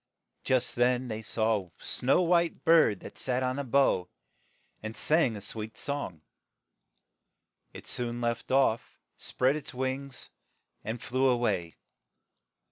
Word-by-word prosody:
But - - -12
just 130 -2 +2
then 125 +1 +2
they 110 0 -4
saw 110 -3 0
a - - -26
snow 135 +8 +1
white 170 -1 +1
bird 160 - +5
that - - -10
sat 130 0 -1
on 130 +2 -1
a - - -1
bough, 125 -9 +2 0.7
and 110 +1 -6
sang 150 -8 +2
a - - -8
sweet 110 +1 -6
song. 115 - -4 1.5
It - - -11
soon 120 -1 -2
left 120 -1 -2
off, 130 -4 +2 0.2
and - - -23
spread 130 +3 +1
its 150 -3 -7
wings, 130 +1 -4 0.5
and 110 +2 -4
flew 130 +3 +1
a 125 - +3
way. 95 -8 -1
125 Hz, 145 wpm, -29 LUFS, 110-135 Hz, 1.5 s, bird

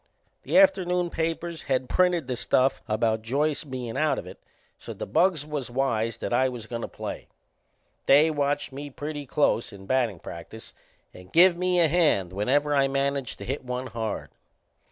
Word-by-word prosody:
The - - 0
afternoon 180 -11 +3
papers 165 0 -3
had 130 -2 -1
printed 180 -2 +2
the 125 0 -3
stuff 130 +2 +1
about 110 +1 0
Joyce 140 +7 0
bein' 125 -5 -5
out 155 -1 +2
of - - -5
it, - - -11 0.4
so - - -8
the - - -5
bugs 170 - +2
was 150 -5 -4
wise 115 -3 -1
that - - -4
I 130 +2 +3
was 120 -3 -7
goin' 115 +1 -5
to - - -4
play. - - -7 0.8
They 150 +4 +6
watched 145 -1 -1
me 145 +2 -7
pretty 145 +1 -6
close 125 -4 +1
in 100 -2 -12
battin' 120 -4 +1
practice 85 +7 -10 0.4
and 90 +1 -14
give 175 +1 +6
me 180 0 +1
a 170 - +5
hand 145 - +2
whenever 140 +9 +1
I 135 -1 +4
managed 140 -1 -1
to - - -8
hit 135 +2 -3
one 125 0 -4
hard. 115 -4 -4
135 Hz, 175 wpm, -26 LUFS, 120-155 Hz, 0.8 s, They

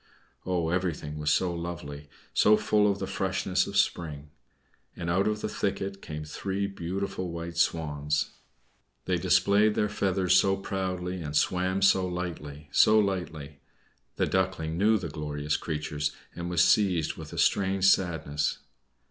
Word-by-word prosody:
Oh! 85 -3 0
everything 85 -4 -2
was 75 0 0
so 90 +3 +2
lovely, 80 -4 -6 0.2
so 105 +1 +5
full 105 -1 +3
of 100 - -3
the - - -3
freshness - - 0
of - - -3
spring! 75 -3 -1 0.6
And 85 0 -3
out 95 +4 +2
of 105 0 -1
the - - -1
thicket 95 0 -3
came 75 0 -6
three 95 +5 -3
beautiful 95 0 -4
white 85 0 -6
Swans. 75 -2 0 0.7
They 90 - +1
displayed 100 +4 +3
their 105 - +1
feathers 95 -3 +1
so 95 +1 +4
proudly 95 -2 -3
and 75 -2 -5
swam 95 +4 +1
so 95 -1 +4
lightly, 80 -5 -6
so 110 +8 +5
lightly! 85 -8 -2 0.6
The - - +1
Duckling 95 -4 -1
knew 105 +5 +3
the 90 -4 -4
glorious 75 -1 -3
creatures, 75 -2 -2 0.2
and 85 0 -4
was 90 -1 +3
seized 90 -6 +3
with - - -10
a - - -8
strange 95 -1 +2
sadness. 80 -6 +2
90 Hz, 150 wpm, -28 LUFS, 75-95 Hz, 0.7 s, so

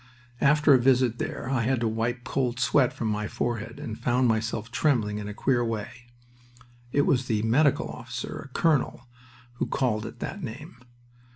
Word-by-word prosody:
After 150 +1 +5
a 130 - +6
visit 125 -2 +3
there 130 - -4
I 130 -3 +1
had 130 +2 +1
to 115 - +2
wipe 115 +2 -2
cold 125 -1 -1
sweat 130 -1 +3
from 115 - -3
my 105 0 -1
forehead, 115 0 -3
and 110 - -6
found 125 +1 +2
myself 110 0 -1
trembling 120 -7 +1
in 105 - -5
a 105 - -5
queer 120 0 +1
way. 115 0 -3 1.0
It 145 - +3
was 130 -2 +1
the 110 -3 0
medical 135 +6 +3
officer - - -6
a - - -9
colonel 150 -5 +1 0.5
who - - -1
called 110 -4 0
it - - -10
that 195 - -5
name. 140 0 -8
120 Hz, 175 wpm, -27 LUFS, 110-135 Hz, 1.0 s, a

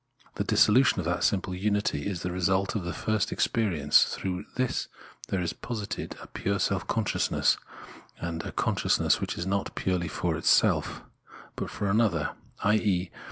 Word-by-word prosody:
The - - -2
dissolution 125 +4 +4
of 90 - -2
that 85 0 0
simple 95 -2 +1
unity 105 +3 0
is 95 -4 -3
the 90 - -2
result 95 +2 +1
of 105 - -2
the 90 - -2
first 110 +4 -1
experience; 85 -11 +3
through 95 +1 -4
this 130 -1 -1 0.4
there 95 - -1
is 85 - -2
posited 110 -5 -5
a - - -9
pure 100 +1 -2
self 95 -1 0
consciousness, 110 -3 +1 0.6
and 85 -1 -3
a - - -6
consciousness - - +1
which - - -3
is 85 - -3
not 100 +1 -2
purely 90 -2 -1
for 75 - -1
itself, - - +2 0.5
but - - -4
for 100 - -3
another, 100 -7 +2 0.3
i.e. 100 -3 +2
95 Hz, 160 wpm, -28 LUFS, 90-105 Hz, 0.6 s, dissolution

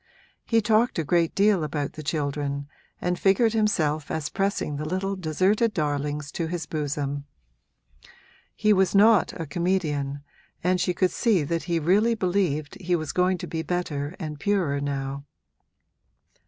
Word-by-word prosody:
He 225 -1 +3
talked 220 +2 +2
a 165 - +1
great 165 +1 +1
deal 200 -4 +3
about 145 -1 -3
the 155 - -7
children 145 -2 -2 0.3
and 180 0 -1
figured 210 +4 +3
himself 160 -9 +1
as 155 -2 -2
pressing 195 -7 -1
the 150 - -4
little 195 +2 -1
deserted 190 +6 +1
darlings 145 -2 -2
to 165 - -2
his 170 -2 -3
bosom. 145 -2 -3 1.3
He 215 0 +3
was 190 0 +2
not 215 0 +5
a 165 - -3
comedian, 145 -4 -1 0.4
and 180 +1 +2
she 180 - 0
could 185 +1 +2
see 215 - +2
that 165 +3 -2
he 170 -2 0
really 200 +9 +3
believed 180 -7 -1
he 180 0 +1
was 155 -3 -3
going 185 0 +2
to - - -10
be 160 - -3
better 160 -2 -3
and 155 -4 -5
purer 175 -6 +1
now. 140 0 -3
170 Hz, 155 wpm, -25 LUFS, 145-195 Hz, 1.3 s, not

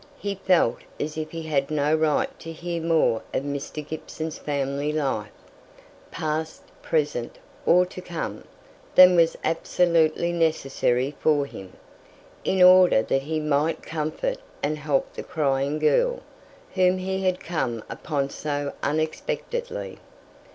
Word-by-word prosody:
He 200 -5 -3
felt 185 -9 +2 0.2
as 155 +1 -3
if 155 -1 -4
he 165 -1 -6
had 140 -3 0
no 150 0 +1
right 160 - +1
to 165 - -7
hear 170 +1 -4
more 160 -9 +2
of - - 0
Mr. 145 +1 -5
Gibson's 160 0 -6
family 140 0 -2
life, 135 -9 -1 0.8
past, 155 +1 -3 0.2
present, 145 -6 -1 0.3
or 180 +1 +6
to 185 0 -9
come, 175 -2 -5 0.5
than 185 0 +9
was 165 -1 +3
absolutely 170 0 +2
necessary 140 -5 +1
for 145 -2 +2
him, 95 -8 -10 0.7
in 190 -1 +3
order 180 -9 +7
that 135 - 0
he 155 +3 -2
might 150 +1 0
comfort 165 - -3 0.2
and 150 +1 -1
help 145 -2 0
the - - -6
crying 140 -3 0
girl, - - +2 0.5
whom 185 -1 +3
he 190 +1 -2
had 185 -1 +1
come 130 -9 -3
upon 140 -3 -3
so 145 -1 -3
unexpectedly. 465 - -3
155 Hz, 130 wpm, -25 LUFS, 145-175 Hz, 0.8 s, than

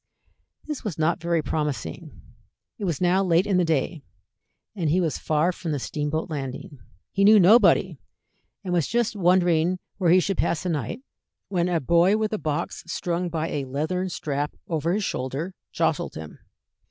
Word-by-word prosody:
This 300 -3 -5
was 205 -8 -4
not 160 +1 +1
very 170 -2 0
promising. 140 - -4 0.6
It 205 - -3
was 170 -6 -1
now 185 +2 +3
late 175 0 +3
in 195 -3 +1
the 180 - +3
day, 160 0 -1 0.7
and 170 -6 -1
he 175 +5 +3
was 165 -4 -1
far 155 +3 +1
from 170 -3 -4
the - - 0
steamboat 150 +4 -2
landing. 140 -2 -6 0.3
He 195 - +1
knew 210 +1 +8
nobody, 185 - +5 0.6
and 180 -2 -3
was 170 -5 +1
just 235 -1 0
wondering 180 -2 +3 0.2
where 180 -3 +2
he 180 +2 +6
should 195 +1 -1
pass 170 - 0
the 180 - -2
night, 150 - -3 0.5
when 180 -2 0
a 170 -2 +1
boy 170 +7 +3
with 220 0 -1
a 215 - -1
box 155 +2 -3
strung 175 +1 -2
by 165 0 -2
a 140 -2 -2
leathern 155 +8 -2
strap 145 -3 -3
over 165 0 -1
his 210 +1 0
shoulder 140 +5 -3 0.2
jostled - - -1
him. 80 -1 -9
170 Hz, 175 wpm, -25 LUFS, 150-185 Hz, 0.7 s, knew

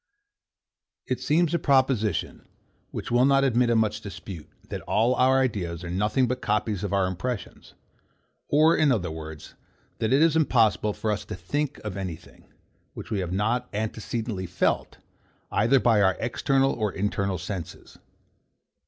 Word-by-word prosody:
It - - -2
seems 165 +2 +2
a 170 - +2
proposition, 130 -6 +1 0.4
which - - -6
will 120 +1 +4
not 135 0 +4
admit 125 -2 +2
of 115 - +3
much 110 -2 0
dispute, 95 -5 -9 0.2
that - - -5
all 115 +4 +3
our 130 +1 +4
ideas 90 -9 -2
are 85 - -5
nothing 105 +7 +1
but 125 +1 -3
copies 105 -2 -1
of 100 - -2
our 100 -1 +2
impressions, 100 +5 -5 0.7
or, 155 +3 +4
in 155 -3 +3
other 95 -9 0
words, 80 -1 -9 0.5
that 110 - 0
it 140 +4 +5
is 165 -1 +3
impossible 115 -8 +2
for 110 - -2
us 105 -3 -2
to - - -6
think 140 +11 -3
of 105 -3 -5
any 95 -4 -3
thing, 80 - -20 0.4
which - - -9
we 105 - 0
have 90 -2 -3
not 110 +6 0
antecedently 110 -2 -3
felt, 90 +1 -1 0.5
either 130 +5 +3
by 115 -4 +3
our 95 -2 +3
external 135 +3 +1
or 105 -3 -1
internal 100 -1 -1
senses. 90 0 -7
110 Hz, 160 wpm, -26 LUFS, 95-130 Hz, 0.7 s, it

